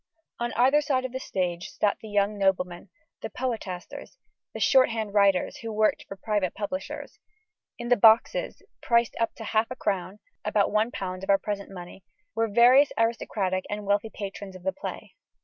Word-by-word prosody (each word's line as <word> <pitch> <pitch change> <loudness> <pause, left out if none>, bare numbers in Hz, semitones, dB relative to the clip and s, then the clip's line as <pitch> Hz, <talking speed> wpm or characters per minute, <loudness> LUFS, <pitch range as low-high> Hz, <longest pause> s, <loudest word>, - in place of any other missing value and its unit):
On 240 0 -2
either 265 +5 +4
side 265 -3 0
of 255 - -4
the 260 - -4
stage 180 -7 -3
sat 205 -1 0
the 220 - -9
young 205 0 +1
noblemen, 180 -1 0 0.3
the - - -5
poetasters, 225 - -5
and - - -52
the - - -4
shorthand 225 -6 +3
writers 200 -3 +3
who 225 -1 -6
worked 215 0 +1
for 195 - -7
private 205 -3 -1
publishers. 215 +8 -5 0.6
In 240 -1 -6
the 245 - +6
boxes 230 - +3 0.2
priced 235 -1 +2
up 230 - 0
to 225 - -8
half 220 +1 +1
a 255 - -5
crown 195 -4 -2 0.3
(about 205 -2 +1
£1 200 -4 -1
of 195 - -7
our 200 - +6
present 200 -1 -5
money) 180 0 -10 0.3
were 225 0 +1
various 245 +6 +6
aristocratic 205 -5 0
and 210 0 -4
wealthy 205 +2 +1
patrons 200 -2 -7
of 185 - -12
the 190 - -1
play. 290 - -7
210 Hz, 175 wpm, -26 LUFS, 195-235 Hz, 0.6 s, the